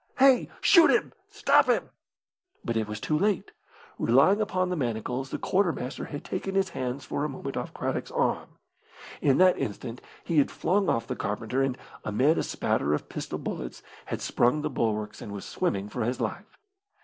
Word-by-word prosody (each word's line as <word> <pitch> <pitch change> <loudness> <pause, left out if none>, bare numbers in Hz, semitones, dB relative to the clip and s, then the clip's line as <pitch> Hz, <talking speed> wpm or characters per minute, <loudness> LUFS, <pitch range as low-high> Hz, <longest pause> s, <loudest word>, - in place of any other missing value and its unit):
Hey, 265 -2 +5
shoot 340 -4 +7
him! - - +2 0.2
Stop 415 0 +4
him!" - - +1 0.7
But 115 - -1
it 110 -1 0
was 105 0 -5
too 155 - -1
late. 205 -1 0 0.5
Relying 140 - +4
upon 185 -3 0
the - - 0
manacles, 125 -1 -2
the - - -3
quartermaster 175 -9 -1
had 145 - -7
taken 195 +1 -3
his 195 -1 +2
hands 130 -1 -4
for 140 - -2
a 150 - -1
moment 135 - -6
off - - -3
Craddock's - - -3
arm. - - 0 0.7
In 135 -2 +4
that 185 0 +5
instant 115 +3 -4 0.2
he 165 -3 +2
had 140 - +3
flung 195 +3 +1
off 115 - +1
the - - -4
carpenter, 110 +5 -2
and, 135 -1 0 0.3
amid 130 +10 +2
a - - 0
spatter 75 +1 0
of - - -6
pistol - - -4
bullets, 60 - -6 0.2
had - - -4
sprung 135 +6 +2
the 150 - -1
bulwarks 105 -3 -2
and 105 - -7
was 100 - -6
swimming 100 +1 -1
for 105 - -3
his 125 +3 -1
life. - - -4
135 Hz, 185 wpm, -27 LUFS, 110-185 Hz, 0.7 s, shoot